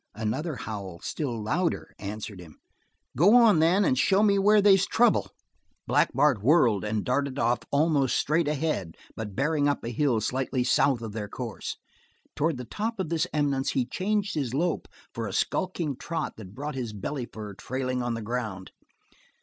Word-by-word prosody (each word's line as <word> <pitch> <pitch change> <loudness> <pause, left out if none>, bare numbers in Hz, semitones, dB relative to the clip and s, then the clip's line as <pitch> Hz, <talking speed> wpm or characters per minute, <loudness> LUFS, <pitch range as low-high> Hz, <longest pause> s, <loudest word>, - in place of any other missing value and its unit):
Another 130 +9 -2
howl, 100 -7 -6
still 125 -7 -3
louder, 165 +11 -1
answered 105 -1 -6
him. 85 -4 -13 0.6
"Go 200 +9 +6
on, 230 -8 +6
then, 180 +5 +4
and 130 - +3
show 195 +7 +4
me 200 -2 +4
where 210 +2 +5
they's 195 -2 +5
trouble." 235 -1 +3 0.6
Black - - +3
Bart 135 -5 +3
whirled 120 - +4
and 105 0 -2
darted 140 +1 0
off 120 -1 +2
almost 140 -3 +2
straight 155 +2 +1
ahead, 150 - -2 0.2
but 105 -3 -6
bearing 145 +1 +1
up 145 - -1
a 115 - -3
hill 120 -1 +1
slightly 125 +3 -1
south 130 -1 +2
of 110 - -5
their 105 -1 -5
course. 120 0 -5 0.6
Toward 155 -1 0
the 125 - -6
top 215 - -4
of 185 -5 -2
this 165 +1 0
eminence 140 -3 0
he 130 -2 +1
changed 200 - -1
his 135 -5 -2
lope 170 +3 -1 0.3
for 115 -1 -3
a 95 - -6
skulking 170 - -1
trot 160 +4 -4
that 100 -2 -11
brought 145 +3 -4
his 120 -5 -4
belly 120 +5 -4
fur 105 -2 -7
trailing 130 +5 -3
on 120 -1 -1
the 115 - -5
ground. 110 -5 -4
135 Hz, 175 wpm, -27 LUFS, 110-165 Hz, 0.6 s, Go